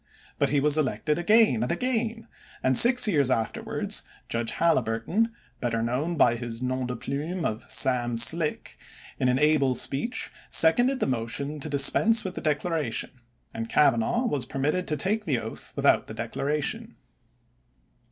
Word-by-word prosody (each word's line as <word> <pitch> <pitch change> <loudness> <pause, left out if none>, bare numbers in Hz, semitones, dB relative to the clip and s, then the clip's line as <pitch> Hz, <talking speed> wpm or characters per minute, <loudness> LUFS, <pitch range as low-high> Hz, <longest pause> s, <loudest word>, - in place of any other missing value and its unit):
But - - +2
he 145 - +1
was 150 +2 +2
elected 150 +3 -1
again 210 - +3
and 120 - -1
again, 230 +2 -2 0.4
and 130 0 +2
six 245 - +8
years 145 -10 +2
afterwards 115 -4 -1 0.3
Judge 115 0 -2
Haliburton, 165 - 0 0.3
better 115 -2 -2
known 140 +9 -2
by 120 -4 +3
his 115 -1 -5
nom 130 0 -2
de 125 - -4
plume 155 +9 -4
of 110 0 -4
"Sam 120 -2 +1
Slick", 155 +6 +1 0.4
in 130 - +1
an 125 0 +2
able 145 -3 +2
speech, 235 - -1 0.2
seconded 245 +11 +3
the - - +2
motion 130 +4 -3
to 155 - -6
dispense 150 +11 +3
with 185 - -5
the - - -7
declaration, 150 -5 -2 0.4
and 115 0 -5
Cavanaugh 145 - +2
was 145 - -2
permitted 150 +7 -2
to 150 - -2
take 210 +8 -1
the 140 -8 0
oath 110 0 -7
without - - +2
the - - -8
declaration. 145 +1 -3
145 Hz, 150 wpm, -26 LUFS, 125-175 Hz, 0.4 s, six